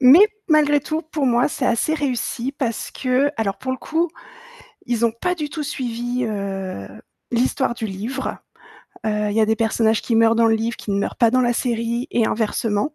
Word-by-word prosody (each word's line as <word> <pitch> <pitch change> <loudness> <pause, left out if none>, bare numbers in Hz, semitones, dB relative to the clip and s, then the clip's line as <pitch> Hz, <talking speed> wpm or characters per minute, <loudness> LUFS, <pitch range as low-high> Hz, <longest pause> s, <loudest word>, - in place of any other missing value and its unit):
Mais 285 +11 +9 0.2
malgré 295 -2 +4
tout, 310 +3 -3
pour 310 -3 -2
moi, 245 +2 +3
c'est 290 -3 -2
assez 240 +7 +1
réussi 265 -3 -2
parce 240 -5 -3
qu'alors, 255 -6 0
pour 260 - -3
le - - -2
coup, 330 +5 0 0.8
ils 235 -1 +1
ont 230 - +2
pas 360 +11 -2
du 300 -3 -4
tout 305 +1 -4
suivi, 245 -3 -3
heu, 195 - -4 0.4
l'histoire 245 +1 +1
du 225 - -4
livre, 220 +7 -4 0.7
heu, 210 -1 0
il 205 - -3
y - - +4
a 215 - +4
des 220 +1 +2
personnages 225 0 +2
qui 235 - -1
meurent 225 0 +5
dans 230 0 +4
le 225 - +4
livre, 225 +1 -1
qui - - -7
ne 200 - +1
meurent - - -2
pas 235 -3 +4
dans 255 +2 +3
la 240 -1 +2
série 235 0 -1
et 235 - +3
inversement, 220 +3 -1
235 Hz, 200 wpm, -21 LUFS, 225-275 Hz, 0.8 s, Mais